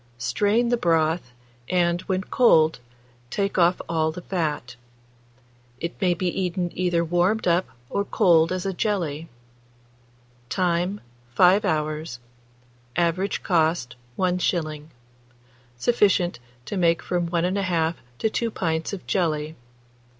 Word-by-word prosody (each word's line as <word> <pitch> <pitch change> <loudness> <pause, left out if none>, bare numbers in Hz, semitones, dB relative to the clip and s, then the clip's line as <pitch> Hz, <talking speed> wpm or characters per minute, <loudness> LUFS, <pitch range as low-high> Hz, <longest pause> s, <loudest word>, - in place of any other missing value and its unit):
Strain 205 - +1
the 240 - +2
broth, 165 - +1 0.4
and, 175 -1 +2
when 190 0 0
cold, 160 - +4 0.5
take 200 +5 -1
off 175 +1 +4
all 160 -1 0
the 175 +2 -9
fat. 150 -9 -3 1.0
It 170 +1 -3
may 180 -2 +3
be 185 - -3
eaten 180 -1 -1
either 175 -2 0
warmed 175 +6 +1
up 175 +2 +2 0.2
or 200 - -1
cold 165 -4 +3
as 185 0 -2
a 195 - -1
jelly. 170 -7 -2 1.2
Time. 180 +2 0 0.3
5 185 +3 +5
hours. 155 -4 -2 0.8
Average 175 +3 0
cost, 160 -7 +1 0.2
1s. 175 -4 -1 0.9
Sufficient 190 - +2 0.3
to 205 - -4
make 170 -2 +2
from 175 -1 -1
1 170 0 0
1/2 180 -3 0 0.2
to - - +1
2 230 +1 -1
pints 165 -4 -2
of 195 - -6
jelly. 155 -4 -1
175 Hz, 120 wpm, -24 LUFS, 160-185 Hz, 1.2 s, 5